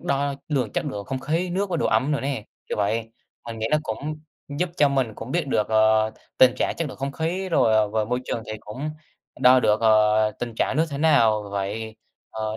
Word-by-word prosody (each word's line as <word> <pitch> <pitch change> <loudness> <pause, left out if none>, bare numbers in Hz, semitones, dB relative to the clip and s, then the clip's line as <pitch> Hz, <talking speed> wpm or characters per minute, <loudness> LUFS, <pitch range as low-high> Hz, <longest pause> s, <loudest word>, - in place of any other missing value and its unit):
đo 140 0 -1
lường 130 -8 -1
chất - - -1
lượng 100 -1 -5
không 130 -1 -4
khí, 165 +6 -1
nước 190 +2 -1
và 170 - 0
độ - - 0
ẩm 140 +3 +1
nữa 145 - 0
nè, 135 -6 -3 0.2
kiểu - - -3
vậy. 115 +2 -1 0.4
Mình 115 -1 -6
nghĩ 110 - -1
nó 155 - +4
cũng 150 +7 -5 0.3
giúp 170 +5 -2
cho 145 - +5
mình 130 -5 0
cũng 115 +3 -8
biết 170 -3 0
được, 105 -6 0
ờ, 110 0 +3 0.3
tình 130 -1 +6
trạng - - 0
chất 165 -3 -2
lượng - - -9
không 135 +1 -4
khí 180 +5 -2
rồi, 115 -9 +3
ờ 105 -1 +3
và 110 0 0
môi 125 +3 -2
trường 115 - -3
thì - - -5
cũng 135 +9 -6 0.5
đo 125 0 +7
được, 105 -1 +2
ờ, 110 -1 +4
tình 120 -2 -5
trạng 130 - 0
nước 160 - +3
thế 140 - -4
nào 115 -9 +4
vậy, 105 +3 -4 0.3
ờ, 110 0 -4
125 Hz, 230 wpm, -24 LUFS, 110-145 Hz, 0.5 s, đo